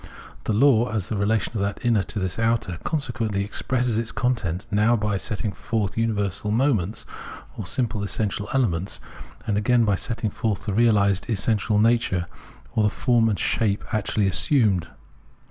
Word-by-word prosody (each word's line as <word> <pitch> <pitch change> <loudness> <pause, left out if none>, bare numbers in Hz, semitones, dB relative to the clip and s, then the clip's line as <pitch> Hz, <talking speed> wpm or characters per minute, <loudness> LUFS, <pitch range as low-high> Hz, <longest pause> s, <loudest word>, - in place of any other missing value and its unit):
The - - 0
law, 120 0 +4
as 105 -4 -2
the 110 - -1
relation 105 +2 0
of 105 - -1
that 100 +4 -3
inner 115 -4 +3
to 105 - -6
this 95 0 -2
outer, 115 -6 0
consequently 120 - -1
expresses 120 +2 0
its 115 0 -3
content, 100 -10 -1
now 105 +3 +3
by 105 -2 0
setting 105 +1 -3
forth 105 0 -2
universal 105 -3 -1
moments, 110 -4 +1 0.5
or - - -5
simple 115 -5 -1
essential 100 0 -2
elements, 95 -9 0 0.5
and 105 -2 +1
again 120 +2 +3
by 100 - +2
setting 110 +2 -2
forth 110 -1 -2
the 105 - -1
realised 100 -3 +3
essential 105 -1 +1
nature 110 -5 +2 0.5
or 110 - +2
the 105 - +4
form 120 -3 +2
and 105 - 0
shape 105 -3 0
actually 105 -1 +1
assumed. 100 - +2
110 Hz, 160 wpm, -24 LUFS, 100-115 Hz, 0.5 s, law